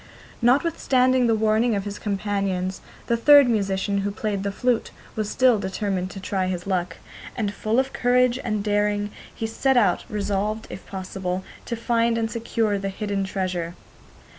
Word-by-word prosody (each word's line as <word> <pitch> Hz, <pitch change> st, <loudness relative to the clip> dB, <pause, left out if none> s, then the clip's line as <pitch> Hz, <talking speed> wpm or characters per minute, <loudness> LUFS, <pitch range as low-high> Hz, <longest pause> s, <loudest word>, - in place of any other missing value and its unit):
Notwithstanding 255 Hz, -1 st, +3 dB
the 225 Hz, -, +3 dB
warning 220 Hz, +1 st, +2 dB
of 200 Hz, -, -1 dB
his 205 Hz, 0 st, -5 dB
companions, 195 Hz, -2 st, -2 dB, 0.2 s
the 235 Hz, -, +1 dB
third 285 Hz, +3 st, +7 dB
musician, 200 Hz, -3 st, 0 dB
who 200 Hz, +1 st, -1 dB
played 205 Hz, -1 st, -2 dB
the 200 Hz, 0 st, -2 dB
flute, 245 Hz, +3 st, 0 dB, 0.3 s
was 215 Hz, -1 st, -2 dB
still 250 Hz, -3 st, +4 dB
determined 190 Hz, -1 st, -2 dB
to 195 Hz, -, -8 dB
try 190 Hz, -1 st, -1 dB
his 180 Hz, -1 st, -3 dB
luck, 180 Hz, -3 st, -1 dB, 0.4 s
and, 205 Hz, -4 st, -2 dB
full 220 Hz, +3 st, -1 dB
of 265 Hz, +1 st, +1 dB
courage 250 Hz, 0 st, +3 dB
and 215 Hz, -4 st, -1 dB
daring, 205 Hz, 0 st, 0 dB, 0.2 s
he 225 Hz, -, -5 dB
set 260 Hz, +4 st, +1 dB
out, 200 Hz, -7 st, +3 dB
resolved, 210 Hz, +1 st, -2 dB
if -, -, -9 dB
possible, 190 Hz, -1 st, -4 dB, 0.2 s
to 235 Hz, -, -3 dB
find 230 Hz, 0 st, +1 dB
and 225 Hz, 0 st, -1 dB
secure 225 Hz, -3 st, -1 dB
the 195 Hz, 0 st, -3 dB
hidden 200 Hz, 0 st, -2 dB
treasure. 185 Hz, -3 st, -3 dB
210 Hz, 165 wpm, -24 LUFS, 195-230 Hz, 0.4 s, third